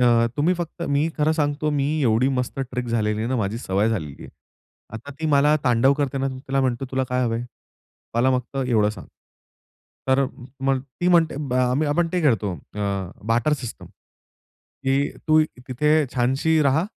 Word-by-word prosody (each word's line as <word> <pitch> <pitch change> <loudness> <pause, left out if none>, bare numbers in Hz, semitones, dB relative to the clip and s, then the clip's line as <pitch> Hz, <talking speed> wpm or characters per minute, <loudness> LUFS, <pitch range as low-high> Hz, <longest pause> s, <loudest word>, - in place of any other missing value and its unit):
अ, 120 -1 +4
तुम्ही 165 +5 +2
फक्त 170 0 -5
मी 145 +3 +2
खरं 155 +1 +2
सांगतो 150 -1 0
मी 140 -1 0 0.2
एवढी 120 +1 +3
मस्त 125 +1 -3
ट्रिक 125 -1 -3
झालेली 105 -2 0
आहे 115 - -1
ना, 130 - 0
माझी 110 +1 -1
सवय 100 -1 0
झालेली. 80 -11 -4 0.7
आता 125 +6 -8
ती 160 - -1
मला 150 0 +4
तांडव 125 +2 +4
करते 140 -1 -1
ना 135 0 0
तर 130 - -6
तिला 135 0 +1
म्हणतो, 130 0 0
"तुला 130 0 0
काय 125 0 0
हवंय? 115 0 -1 0.7
मला 120 +3 +3
फक्त 125 +2 -10
एवढं 110 -4 +3
सांग." 110 - -10 1.0
तर 135 +1 +4 0.4
मग 135 -1 +2
ती 140 +7 -3
म्हणते 170 -4 +4
ब - - -3
आम्ही 130 +4 +2
आपण 165 +3 +1
ते 180 - +1
खेळतो 110 -9 +2 0.2
अ, 105 - -5 0.5
बार्टर 115 +6 +2
सिस्टम, 130 -6 -5 1.0
की 135 +1 +1 0.2
"तू 155 0 +6 0.3
तिथे 150 +4 +2
छानशी 135 +6 +2
रहा, 140 +5 +2
130 Hz, 175 wpm, -23 LUFS, 120-150 Hz, 1.0 s, तू